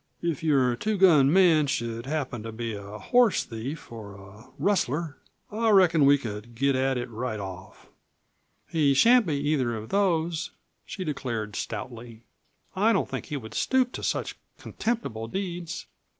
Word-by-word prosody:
If 170 Hz, -5 st, -1 dB
your 135 Hz, -6 st, +3 dB
two 215 Hz, -, -1 dB
gun 165 Hz, -2 st, +5 dB
should 115 Hz, -2 st, -3 dB
happen 135 Hz, -6 st, -3 dB
to 115 Hz, +1 st, -6 dB
be 115 Hz, 0 st, -4 dB
a 100 Hz, +1 st, -8 dB
horse 245 Hz, -, +3 dB
thief, 120 Hz, +8 st, -7 dB
or 105 Hz, -4 st, -9 dB
a 100 Hz, +5 st, -14 dB
rustler, 165 Hz, -5 st, 0 dB, 0.3 s
I 225 Hz, +2 st, +1 dB
reckon 175 Hz, -7 st, +5 dB
we 145 Hz, 0 st, +6 dB
could 115 Hz, -2 st, -7 dB
get 140 Hz, +3 st, +2 dB
at 130 Hz, 0 st, +1 dB
it 120 Hz, -, -3 dB
right 115 Hz, -1 st, -4 dB
off." 95 Hz, -2 st, -9 dB, 0.8 s
"He 145 Hz, -4 st, +2 dB
shan't 235 Hz, -, +5 dB
be 150 Hz, -, 0 dB
either 140 Hz, -4 st, 0 dB
of 110 Hz, +1 st, -8 dB
those," 170 Hz, -5 st, 0 dB, 0.4 s
she 190 Hz, -, -5 dB
declared 115 Hz, -, -4 dB
stoutly. 115 Hz, +1 st, -6 dB, 0.5 s
"I 215 Hz, +4 st, +3 dB
don't -, -, +1 dB
think -, -, -5 dB
he 150 Hz, -, -3 dB
would 110 Hz, -4 st, -9 dB
stoop 260 Hz, -2 st, +1 dB
to -, -, -6 dB
such -, -, -2 dB, 0.2 s
contemptible 170 Hz, -, -3 dB
deeds. 175 Hz, -, -5 dB
140 Hz, 155 wpm, -26 LUFS, 115-175 Hz, 0.8 s, we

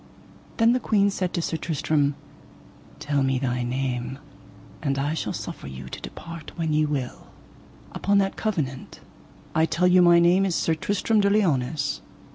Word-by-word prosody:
Then 230 Hz, +1 st, +5 dB
the 250 Hz, -, +1 dB
queen 205 Hz, -3 st, +2 dB
said 185 Hz, -2 st, -2 dB
to 170 Hz, -, -1 dB
Sir 165 Hz, -, -1 dB
Tristram: 150 Hz, -2 st, 0 dB, 0.8 s
Tell 145 Hz, -2 st, -1 dB
me 135 Hz, -1 st, +1 dB
thy 125 Hz, -1 st, -1 dB
name, 125 Hz, 0 st, -2 dB, 0.6 s
and 140 Hz, -2 st, -1 dB
I 145 Hz, +3 st, 0 dB
shall 160 Hz, -, -2 dB
suffer -, -, -6 dB
you 65 Hz, -1 st, -8 dB
to -, -, -8 dB
depart 165 Hz, -2 st, -9 dB
when 160 Hz, -3 st, -1 dB
ye 155 Hz, 0 st, +3 dB
will. 135 Hz, -4 st, -4 dB, 0.6 s
Upon 200 Hz, 0 st, +1 dB
that 195 Hz, -1 st, +1 dB
covenant 150 Hz, -, -3 dB, 0.5 s
I 160 Hz, +1 st, +3 dB
tell 180 Hz, +3 st, +1 dB
you 180 Hz, 0 st, +6 dB
my 175 Hz, -1 st, +7 dB
name 175 Hz, +3 st, +5 dB
is 190 Hz, -3 st, 0 dB
Sir 165 Hz, -, +1 dB
Tristram 205 Hz, +6 st, 0 dB
de 200 Hz, -, +3 dB
Liones. 150 Hz, -8 st, +1 dB
160 Hz, 165 wpm, -25 LUFS, 135-185 Hz, 0.8 s, my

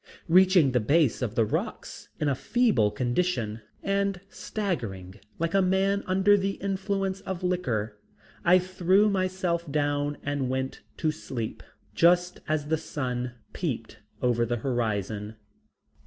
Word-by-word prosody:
Reaching 180 Hz, -4 st, +5 dB
the 125 Hz, -, +2 dB
base 140 Hz, +3 st, +2 dB
of 120 Hz, -3 st, -2 dB
the 115 Hz, -, +3 dB
rocks -, -, -4 dB
in 150 Hz, -, 0 dB
a 140 Hz, -, +3 dB
feeble 210 Hz, -, +2 dB
condition 120 Hz, -3 st, -1 dB, 0.2 s
and 195 Hz, -1 st, 0 dB
staggering 105 Hz, -, -4 dB, 0.2 s
like 165 Hz, 0 st, -1 dB
a 195 Hz, -, +4 dB
man 190 Hz, +2 st, +2 dB
under 190 Hz, +2 st, +4 dB
the 195 Hz, +1 st, 0 dB
influence 195 Hz, 0 st, -2 dB
of 190 Hz, -1 st, -5 dB
liquor, 115 Hz, -, -1 dB, 0.4 s
I 175 Hz, +2 st, +6 dB
threw 185 Hz, +3 st, +3 dB
myself 185 Hz, -4 st, -1 dB
down 145 Hz, 0 st, 0 dB
and 140 Hz, -3 st, -1 dB
went 130 Hz, 0 st, -3 dB, 0.2 s
to 155 Hz, -, +1 dB
sleep 120 Hz, -7 st, -5 dB, 0.3 s
just 175 Hz, +7 st, +3 dB
as 155 Hz, -1 st, 0 dB
the 160 Hz, -, +2 dB
sun 125 Hz, -5 st, -3 dB, 0.2 s
peeped 115 Hz, -, -4 dB, 0.2 s
over 120 Hz, -1 st, +2 dB
the 120 Hz, +1 st, -1 dB
horizon. 110 Hz, -3 st, -2 dB
155 Hz, 135 wpm, -27 LUFS, 120-185 Hz, 0.4 s, I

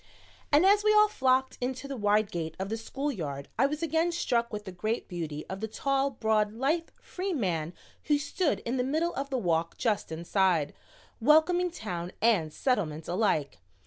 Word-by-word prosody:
And 300 Hz, +5 st, +5 dB
as 405 Hz, +1 st, +5 dB
we 425 Hz, 0 st, +4 dB
all 425 Hz, 0 st, +7 dB
flocked 260 Hz, -7 st, +1 dB
into 255 Hz, +2 st, -3 dB
the 275 Hz, -, -4 dB
wide 210 Hz, -1 st, +2 dB
gate 160 Hz, -4 st, -4 dB
of 190 Hz, +1 st, -4 dB
the 225 Hz, -, -2 dB
school 270 Hz, +6 st, -3 dB
yard 140 Hz, -, -5 dB
I 270 Hz, -, +5 dB
was 300 Hz, +3 st, -4 dB
again 325 Hz, +2 st, +1 dB
struck 240 Hz, -8 st, 0 dB
with 210 Hz, -1 st, -5 dB
the 190 Hz, -, -6 dB
great 215 Hz, +6 st, -2 dB
beauty 160 Hz, -4 st, -5 dB
of 190 Hz, -, -5 dB
the 220 Hz, -, -3 dB
tall, 275 Hz, +4 st, 0 dB
broad, 220 Hz, -4 st, +1 dB
lithe, 300 Hz, +8 st, 0 dB
free 370 Hz, +1 st, -4 dB
man 175 Hz, -, -1 dB, 0.3 s
who 295 Hz, -, +3 dB
stood 305 Hz, +3 st, -1 dB
in 245 Hz, +3 st, -2 dB
the 250 Hz, -, +1 dB
middle 315 Hz, +6 st, 0 dB
of 275 Hz, +1 st, -4 dB
the 265 Hz, -, -1 dB
walk 165 Hz, -6 st, 0 dB
just 210 Hz, -7 st, -1 dB
inside, 170 Hz, -2 st, +1 dB, 0.5 s
welcoming 320 Hz, +7 st, +4 dB
Town 180 Hz, -, -5 dB
and 200 Hz, -9 st, +2 dB
Settlement 165 Hz, -, -1 dB
alike. 175 Hz, -6 st, 0 dB
230 Hz, 185 wpm, -29 LUFS, 180-290 Hz, 0.5 s, all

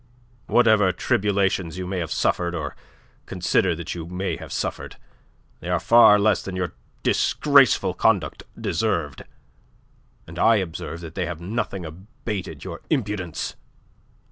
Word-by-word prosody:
"Whatever 110 Hz, -5 st, +4 dB
tribulations 95 Hz, -2 st, 0 dB
you 90 Hz, -, -4 dB
may 90 Hz, 0 st, -3 dB
have 80 Hz, -, -4 dB
suffered 85 Hz, 0 st, 0 dB
or 80 Hz, -3 st, -4 dB, 0.5 s
consider -, -, +1 dB
that 80 Hz, 0 st, -5 dB
you 85 Hz, -2 st, -6 dB
may 90 Hz, +2 st, -3 dB
have -, -, -10 dB
suffered, -, -, -4 dB, 0.6 s
they -, -, -7 dB
are -, -, +1 dB
far 115 Hz, -3 st, +7 dB
less 105 Hz, 0 st, +2 dB
than 95 Hz, -, -6 dB
your 90 Hz, -3 st, -2 dB, 0.3 s
disgraceful -, -, +3 dB
conduct -, -, +1 dB, 0.2 s
deserved, -, -, -1 dB, 1.0 s
and 85 Hz, +2 st, -9 dB
I 115 Hz, -, +5 dB
observe 85 Hz, -3 st, -4 dB
that 80 Hz, -2 st, -8 dB
they 90 Hz, -2 st, -2 dB
have 85 Hz, -2 st, -5 dB
nothing 95 Hz, -1 st, -3 dB
abated 95 Hz, +4 st, -7 dB
your 85 Hz, -3 st, -7 dB
impudence. 105 Hz, -, -2 dB
95 Hz, 135 wpm, -23 LUFS, 85-105 Hz, 1.0 s, far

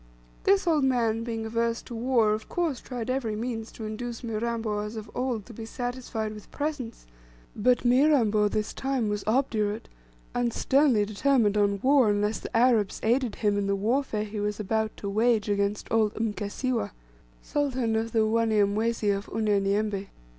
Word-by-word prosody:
This 390 Hz, 0 st, +4 dB
old 315 Hz, -4 st, +3 dB
man, 230 Hz, -4 st, +1 dB
being 225 Hz, -1 st, -3 dB
averse 230 Hz, +1 st, -1 dB
to 245 Hz, -, -9 dB
war, 230 Hz, -2 st, +2 dB
of 215 Hz, 0 st, -5 dB
course 330 Hz, -7 st, -1 dB
tried 245 Hz, -3 st, -5 dB
every 245 Hz, -5 st, -1 dB
means 225 Hz, 0 st, -4 dB
to 220 Hz, -, -7 dB
induce 230 Hz, +3 st, -5 dB
Mirambo 225 Hz, -1 st, -2 dB
as 210 Hz, +2 st, -5 dB
of 215 Hz, -1 st, -7 dB
old 245 Hz, -5 st, -2 dB
to 240 Hz, -, -11 dB
be 225 Hz, -, -7 dB
satisfied 245 Hz, -2 st, -4 dB
with 210 Hz, -1 st, -12 dB
presents; 285 Hz, -6 st, -4 dB, 0.5 s
but 245 Hz, +4 st, +2 dB
Mirambo 240 Hz, -5 st, +4 dB
this 210 Hz, +1 st, -2 dB
time 265 Hz, -5 st, -1 dB
was 205 Hz, -1 st, -2 dB
obdurate, 220 Hz, -3 st, 0 dB, 0.5 s
and 245 Hz, -1 st, 0 dB
sternly 265 Hz, -7 st, +3 dB
determined 215 Hz, 0 st, +2 dB
on 200 Hz, -1 st, +2 dB
war 265 Hz, -4 st, +5 dB
unless 205 Hz, +1 st, +1 dB
the -, -, -3 dB
Arabs 230 Hz, -4 st, +3 dB
aided 240 Hz, -1 st, +1 dB
him 205 Hz, -2 st, +1 dB
in 200 Hz, -, -1 dB
the 200 Hz, -, +1 dB
warfare 220 Hz, +1 st, 0 dB
he 210 Hz, 0 st, -5 dB
was 210 Hz, +1 st, -2 dB
about 220 Hz, +1 st, -1 dB
to 200 Hz, -, -5 dB
wage 220 Hz, +2 st, +2 dB
against 200 Hz, 0 st, 0 dB
old 220 Hz, -2 st, +2 dB
Mkasiwa, 225 Hz, +3 st, -2 dB, 0.5 s
sultan 260 Hz, -6 st, 0 dB
of 225 Hz, +1 st, -1 dB
the 220 Hz, -1 st, +3 dB
Wanyamwezi 220 Hz, -1 st, +2 dB
of 200 Hz, +1 st, -6 dB
Unyanyembe. 205 Hz, -1 st, 0 dB
225 Hz, 165 wpm, -27 LUFS, 210-245 Hz, 0.5 s, war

